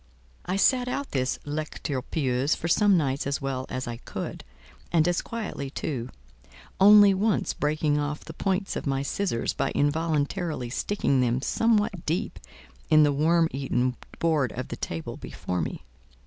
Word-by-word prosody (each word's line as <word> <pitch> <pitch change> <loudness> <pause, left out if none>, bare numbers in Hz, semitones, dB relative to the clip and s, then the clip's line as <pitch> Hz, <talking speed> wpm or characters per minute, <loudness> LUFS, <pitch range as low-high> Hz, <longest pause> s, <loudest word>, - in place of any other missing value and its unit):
I 180 - 0
sat 250 +5 +3
out 275 +2 -3
this 130 -1 0
"lecture 145 -2 -3
pieuse" 135 0 0
for 165 - -4
some 200 +3 +4
nights 140 -3 0
as 140 - -1
well 135 -2 -3
as 130 -1 -4
I 120 -1 -4
could, - - -6 0.5
and 165 -1 +3
as 175 0 +1
quietly 210 -12 -5
too; 130 -3 -4 0.7
only 205 0 +8
once 205 +2 +1
breaking 150 0 0
off 150 +1 -3
the 160 - -8
points 195 +3 -1
of - - -4
my 135 0 0
scissors 140 -5 -1
by - - -1
involuntarily 150 -2 0
sticking 140 -5 +1
them 120 0 +1
somewhat 210 - +1
deep 165 +3 -1 0.5
in 155 0 +7
the 145 -1 +3
worm 165 +3 +3
eaten 130 -2 0 0.2
board 155 -6 +1
of 130 +1 -5
the - - -4
table 80 -1 -5
before 90 -1 -4
me. 80 - -4
150 Hz, 160 wpm, -26 LUFS, 135-185 Hz, 0.7 s, only